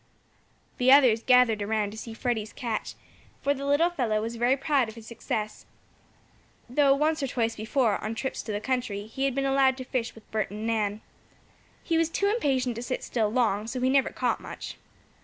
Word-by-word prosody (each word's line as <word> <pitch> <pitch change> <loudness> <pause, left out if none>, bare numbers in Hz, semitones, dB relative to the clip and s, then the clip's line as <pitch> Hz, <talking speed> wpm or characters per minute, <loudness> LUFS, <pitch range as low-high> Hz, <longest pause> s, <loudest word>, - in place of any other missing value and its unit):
The 255 +1 +5
others 255 -5 +6
gathered 250 -4 +4
around 210 0 -1
to 220 - -10
see 225 -1 -8
Freddie's 225 -3 -2
catch, 235 -3 -4 0.5
for 285 - +3
the 280 0 -5
little 310 +5 +3
fellow 235 -10 0
was 225 +2 -4
very 245 +3 +2
proud 275 -4 +1
of 220 - -11
his 225 -2 -11
success, 215 -2 -4 1.0
though, 275 +2 +4
once 310 +2 +1
or 275 - 0
twice 230 -3 -1
before, 220 -1 0
on 220 +1 -3
trips 265 +4 -3
to 220 - -6
the 205 - -2
country, 225 -5 -2
he 265 +5 -3
had 270 -2 0
been 275 0 0
allowed 270 -1 +3
to 260 - -5
fish 250 -2 -3
with 225 - -16
Bert 215 -1 -1
and 210 +2 -6
Nan. 215 -2 -1 0.8
He 330 -1 +1
was 330 -1 +2
too 400 - -1
impatient 270 - +1
to - - -4
sit 255 +1 -3
still 220 -3 0
long, 220 -3 +1
so 255 +2 -3
he 255 +1 +2
never 270 0 +3
caught - - -1
much. - - -8
245 Hz, 200 wpm, -27 LUFS, 220-270 Hz, 1.0 s, others